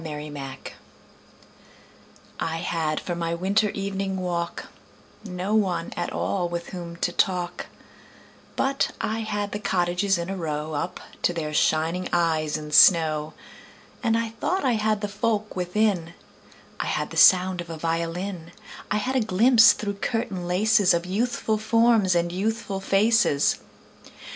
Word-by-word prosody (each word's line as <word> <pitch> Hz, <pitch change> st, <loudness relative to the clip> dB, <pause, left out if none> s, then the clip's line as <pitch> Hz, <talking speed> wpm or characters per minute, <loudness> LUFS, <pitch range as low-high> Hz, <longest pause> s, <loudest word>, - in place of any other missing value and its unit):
Good 150 Hz, -1 st, -6 dB
Hours 135 Hz, -2 st, -7 dB, 1.8 s
I 165 Hz, -, -2 dB
HAD 160 Hz, -2 st, -1 dB
for 175 Hz, -, -4 dB
my 170 Hz, -1 st, -2 dB
winter 200 Hz, +5 st, +1 dB
evening 195 Hz, -1 st, -3 dB
walk 175 Hz, -2 st, -3 dB, 0.6 s
No 185 Hz, 0 st, -4 dB
one 185 Hz, -6 st, 0 dB
at 175 Hz, -, -3 dB
all 180 Hz, -3 st, -1 dB
with 170 Hz, 0 st, -5 dB
whom 170 Hz, -2 st, -7 dB
to 175 Hz, +1 st, -1 dB
talk, 180 Hz, -1 st, -1 dB, 0.9 s
But 270 Hz, 0 st, 0 dB
I 220 Hz, +1 st, -2 dB
had 205 Hz, -2 st, -3 dB
the 210 Hz, -, -4 dB
cottages 180 Hz, 0 st, 0 dB
in 170 Hz, 0 st, -4 dB
a 195 Hz, -, -4 dB
row 155 Hz, -3 st, -4 dB
Up 150 Hz, +4 st, -3 dB, 0.2 s
to 175 Hz, -, +1 dB
their 155 Hz, -3 st, -4 dB
shining 160 Hz, +4 st, +1 dB
eyes 160 Hz, -3 st, +1 dB
in 150 Hz, -1 st, -8 dB
snow. 155 Hz, -2 st, +5 dB, 0.7 s
And 225 Hz, -3 st, +2 dB
I 230 Hz, -1 st, -1 dB
thought 275 Hz, -, -2 dB
I 255 Hz, -, +3 dB
had 215 Hz, -1 st, 0 dB
the 205 Hz, -, -2 dB
folk 210 Hz, +1 st, -2 dB
within: 180 Hz, -2 st, 0 dB, 0.6 s
I -, -, -2 dB
had -, -, -2 dB
the -, -, -8 dB
sound 185 Hz, -1 st, +5 dB
of 170 Hz, -, -10 dB
a 165 Hz, -, -6 dB
violin; 170 Hz, +2 st, -3 dB, 0.4 s
I 210 Hz, -, +1 dB
had 255 Hz, +6 st, -2 dB
a -, -, +4 dB
glimpse 225 Hz, +3 st, +6 dB
through 200 Hz, -1 st, -5 dB
curtain 225 Hz, -7 st, -2 dB
laces 200 Hz, +1 st, +3 dB
Of 170 Hz, +1 st, -2 dB
youthful 220 Hz, +2 st, -1 dB
forms 225 Hz, -4 st, +3 dB
and 170 Hz, 0 st, +1 dB
youthful 200 Hz, +1 st, -2 dB
faces. 195 Hz, -5 st, +2 dB
185 Hz, 150 wpm, -24 LUFS, 170-210 Hz, 1.8 s, glimpse